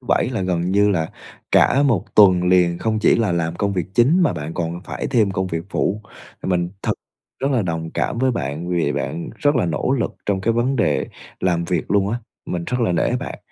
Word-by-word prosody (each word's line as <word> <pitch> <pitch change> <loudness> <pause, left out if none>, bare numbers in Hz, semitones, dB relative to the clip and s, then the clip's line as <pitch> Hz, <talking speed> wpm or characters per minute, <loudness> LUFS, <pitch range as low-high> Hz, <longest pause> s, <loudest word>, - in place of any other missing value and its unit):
thứ 125 - -19
Bảy - - +2
là 115 -6 -2
gần 90 -1 -1
như 105 +1 +4
là 80 -4 -1 0.4
cả 140 - +5
1 120 - +2
tuần 95 -4 +6
liền 90 -1 +3
không 110 -1 0
chỉ 110 - +4
là 110 -6 +1
làm 85 0 -1
công 100 0 0
việc 90 -2 -2
chính 145 - +4
mà 160 - +3
bạn 75 +2 -6
còn 85 0 -3
phải - - -4
thêm 110 -7 +2
công 95 0 -1
việc 85 -2 -3
phụ, 105 +3 -1 0.4
mình 90 -2 0
thật - - +1 0.5
rất 135 - 0
là 125 -6 +2
đồng 80 -2 -3
cảm 115 - -1
với 130 0 +2
bạn, 80 - -3
vì 85 -2 +1
bạn 80 +5 -4
rất 145 +3 +2
là 105 - +1
nỗ 85 - 0
lực - - -2
trong 100 -2 0
cái 115 +4 +1
vấn 125 +4 0
đề 90 - +1 0.3
làm 85 -2 +1
việc 85 -1 -2
luôn 100 -1 +2
á. 120 - -1 0.3
Mình 85 -1 -3
rất 125 +5 -2
là 110 -6 +2
nể 85 - +1
bạn, - - -6
95 Hz, 230 wpm, -21 LUFS, 85-115 Hz, 0.5 s, tuần